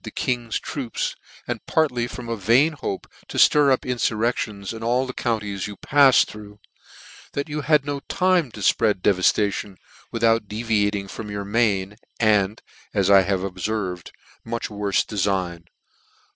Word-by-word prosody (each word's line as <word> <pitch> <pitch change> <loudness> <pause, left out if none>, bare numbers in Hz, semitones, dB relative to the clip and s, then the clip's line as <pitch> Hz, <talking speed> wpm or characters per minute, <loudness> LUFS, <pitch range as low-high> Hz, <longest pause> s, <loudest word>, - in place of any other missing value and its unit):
the - - -6
king's 120 -3 -2
troops, 130 -6 -4 0.3
and - - -4
partly 125 -7 +1
from 120 -1 -8
a 115 - -2
vain 120 - +3
hope 115 -9 -5 0.2
to - - -7
itir 145 -2 +5
up 130 - +2
infurrections 115 -4 -1
in 110 - -8
all 120 +3 +1
the 130 - -6
counties 105 -6 -2
you 105 - -8
patted 140 -2 +5
through, 105 -1 -11 0.7
that 140 +2 -2
you 150 0 -3
hud 150 0 +3
not 145 -1 -5
time 180 -5 +2
to 105 -2 -10
fpread 100 -1 +2
devafta 100 +1 +3
tion, 100 -2 -6 0.3
without 115 -1 +2
deviating 105 -2 0
from 105 +2 -7
your 100 -1 -4
main, 105 -2 0 0.2
and, 105 -2 +2 0.3
as 100 -1 +3
I 100 -1 +8
have 95 0 -1
obferved, 95 -1 -3 0.3
much 115 0 -4
j.'orle 100 -2 0
defign. 95 -4 -2
110 Hz, 155 wpm, -23 LUFS, 100-125 Hz, 0.7 s, I